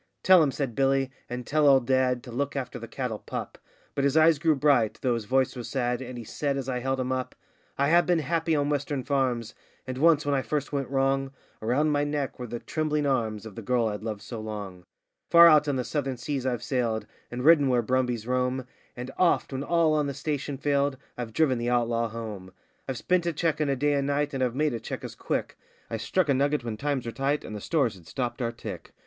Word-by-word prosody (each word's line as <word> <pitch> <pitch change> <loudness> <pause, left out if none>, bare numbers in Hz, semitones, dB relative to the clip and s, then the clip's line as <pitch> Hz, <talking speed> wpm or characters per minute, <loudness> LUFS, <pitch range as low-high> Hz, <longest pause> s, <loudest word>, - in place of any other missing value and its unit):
Tell 185 -2 +7
'em,' 150 - +3
said 135 -3 -3
Billy, 135 +1 +1 0.2
'and 125 0 -5
tell 150 +2 +3
old 135 -3 +5
dad, 130 -1 +2
to 125 - -9
look 140 +4 -2
after 130 -2 -4
the 115 - -8
cattle 115 -2 -4
pup;' - - -6 0.3
But 140 - -1
his 140 +2 +2
eyes 160 -1 +5
grew 155 0 +3
bright, 135 -6 +3
though 125 -2 +2
his 115 -2 -3
voice 130 +4 +1
was 120 -2 -6
sad, 125 -2 -1
and 125 -1 -7
he 120 - -6
said, 140 +5 -2
as 135 -2 -4
I 125 -2 -1
held 130 +1 -1
him 130 0 -1
up: 130 -1 -3 0.4
'I 140 - +2
have 175 +2 +5
been 175 -1 +3
happy 165 +1 0
on 145 -1 +1
western 145 -2 -1
farms. 125 -4 0 0.3
And 130 0 -5
once, 155 -1 +4
when 145 - +1
I 135 - +2
first 145 +1 -3
went 140 -2 -1
wrong, 135 0 0 0.3
Around 135 +8 +1
my 145 0 +2
neck 145 -3 -2
were 125 - -5
the 120 +1 -4
trembling 150 +3 -1
arms 115 -6 0
of 110 - -8
the 115 - -7
girl 120 +1 +1
I'd 105 -1 -5
loved 110 -2 -5
so 115 - -6
long. 100 -4 -7 0.4
Far 170 0 +9
out 155 -3 +6
on 145 - +1
the 130 - -1
southern 135 -2 -2
seas 130 +2 -3
I've 120 -2 -2
sailed, 115 -5 -1 0.2
and 125 +2 -4
ridden 155 -3 +6
where 125 -2 +2
brumbies 125 -2 0
roam, 125 +1 0 0.3
And 125 +1 -6
oft, 175 -5 +2
when 130 - -2
all 165 +1 +2
on 150 -2 +1
the 140 - -4
station 145 -1 -3
failed, 140 -1 +1 0.2
I've 120 -2 -5
driven 130 -1 +2
the 120 +1 -1
outlaw 115 -1 +1
home. 105 -5 -7 0.4
I've 130 - -2
spent 180 -1 +1
a 170 - 0
cheque 160 0 0
in 150 - +1
a 135 - +2
day 145 +3 +1
and 140 -1 0
night, 145 +1 0
and 135 -1 0
I've 125 -1 -1
made 150 0 +1
a 115 - -3
cheque 110 - -6
as - - -6
quick; - - -3 0.3
I 115 - -1
struck 180 - 0
a 140 - +3
nugget 140 +1 +1
when 115 -2 -3
times 140 +1 -2
were 115 - -3
tight, 140 +4 -1
and 110 - -6
the 105 - -6
stores 135 -6 +1
had 90 -4 -16
stopped 120 +8 -3
our 115 -1 0
tick. 115 - -8
130 Hz, 240 wpm, -27 LUFS, 120-145 Hz, 0.4 s, Far